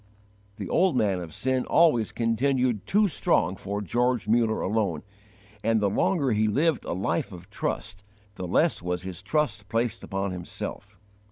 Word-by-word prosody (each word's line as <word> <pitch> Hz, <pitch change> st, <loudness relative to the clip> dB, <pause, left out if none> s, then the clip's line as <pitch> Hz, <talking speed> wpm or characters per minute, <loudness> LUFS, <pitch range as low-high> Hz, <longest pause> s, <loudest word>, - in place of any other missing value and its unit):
The 100 Hz, -3 st, -6 dB
'old 175 Hz, -, +2 dB
man,' 100 Hz, -5 st, +2 dB
of 85 Hz, -3 st, -7 dB
sin 130 Hz, +9 st, 0 dB
always 150 Hz, -11 st, +4 dB
continued 120 Hz, -2 st, 0 dB
too 210 Hz, +1 st, +4 dB
strong 95 Hz, -, +1 dB
for 100 Hz, +2 st, -4 dB
George 120 Hz, +2 st, 0 dB
Muller 115 Hz, 0 st, +2 dB
alone, 100 Hz, -6 st, 0 dB, 0.6 s
and 115 Hz, 0 st, +3 dB
the 100 Hz, -2 st, +1 dB
longer 140 Hz, -, +1 dB
he 110 Hz, 0 st, +2 dB
lived 150 Hz, +7 st, +1 dB
a -, -, -2 dB
'life 100 Hz, -, -1 dB
of 90 Hz, -1 st, -11 dB
trust' 100 Hz, +1 st, -4 dB, 0.3 s
the 95 Hz, -3 st, -6 dB
less 155 Hz, -, +2 dB
was 90 Hz, 0 st, -3 dB
his 95 Hz, -1 st, -6 dB
trust 125 Hz, -5 st, -1 dB
placed 115 Hz, +1 st, -1 dB
upon 95 Hz, 0 st, -2 dB
himself. 90 Hz, -1 st, -6 dB
110 Hz, 160 wpm, -26 LUFS, 95-130 Hz, 0.6 s, always